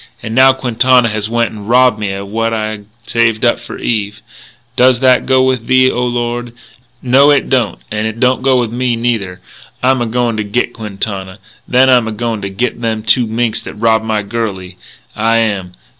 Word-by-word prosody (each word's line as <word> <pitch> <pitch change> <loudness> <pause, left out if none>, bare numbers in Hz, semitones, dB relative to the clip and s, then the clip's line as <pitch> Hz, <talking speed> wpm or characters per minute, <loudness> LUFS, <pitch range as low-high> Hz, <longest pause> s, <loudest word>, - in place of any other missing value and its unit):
And 110 - -5
now 130 +2 +6
Quintana 125 -1 +2
has 105 0 -3
went 115 0 0
and 105 0 -10
robbed 125 -2 +4
me 105 -2 -2
of 100 0 -6
what 115 +2 -1
I'd 110 -2 -4 0.2
saved 115 0 +1
up 120 - +2
for - - -9
Eve.... 105 -2 -3 0.5
Does 125 -1 +4
that 130 -1 +3
go 130 0 +3
with 130 -3 -1
Thee, 130 0 +4
O 125 - -2
Lord? 120 -1 -3 0.5
No, 135 +3 +5
it 145 -2 +2
don't. 125 -5 +1
And 110 0 -1
it 110 +1 -6
don't 130 0 +2
go 130 -1 +2
with 120 -3 -2
me, 125 -1 0
neither. 110 -6 -2 0.4
I'm 130 0 +2
a 120 - -1
goin' 120 -1 -1
to 105 - -1
git 120 +4 -2
Quintana. 100 -3 -4 0.3
Then 130 +1 +4
I'm 125 -3 +4
a - - -3
goin' 110 0 -3
to 100 - -4
git 120 +4 -3
them 110 -2 -2
two 115 +2 +2
minks 115 0 -1
that - - -9
robbed 110 0 +1
my 110 -1 -1
girlie, 100 -4 -5 0.4
I 115 +1 +1
am!... 100 -5 -1
115 Hz, 200 wpm, -14 LUFS, 110-125 Hz, 0.5 s, now